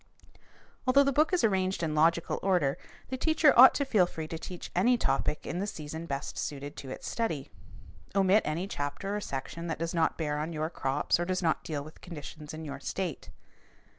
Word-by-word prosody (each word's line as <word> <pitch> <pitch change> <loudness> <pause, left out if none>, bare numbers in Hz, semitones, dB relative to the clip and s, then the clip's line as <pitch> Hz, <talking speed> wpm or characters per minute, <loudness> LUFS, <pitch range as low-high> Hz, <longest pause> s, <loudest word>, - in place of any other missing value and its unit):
Although 275 +2 +6
the 275 - +2
book 305 +6 +3
is 365 - +2
arranged 190 -4 +1
in 155 -2 0
logical 165 +2 +2
order, 180 -8 +1 0.3
the 260 - -3
teacher 315 0 +4
ought 255 +2 +9
to 280 - +1
feel 210 -9 +3
free 160 -2 -6
to 165 - -5
teach 180 +1 -7
any 240 +8 +4
topic 155 - 0
in 175 - -3
the 200 - -1
season 160 -2 -6
best 140 -1 -4
suited 145 -1 -4
to 135 - -7
its - - -7
study. 225 - -2 0.6
Omit 195 +2 +5
any 160 +4 -2
chapter 145 +5 -3
or 210 - -2
section 165 +3 -5
that 165 - -2
does 165 +2 -3
not 165 -2 +1
bear 150 -2 -1
on 160 +3 -3
your 155 +1 -2
crops 135 +2 0
or 175 - 0
does 185 0 -1
not 160 - +1
deal 150 -3 -3
with 155 +2 -13
conditions 150 -3 -8
in 155 0 -7
your 140 -2 -6
state. 175 +2 -4
170 Hz, 200 wpm, -30 LUFS, 150-195 Hz, 0.6 s, ought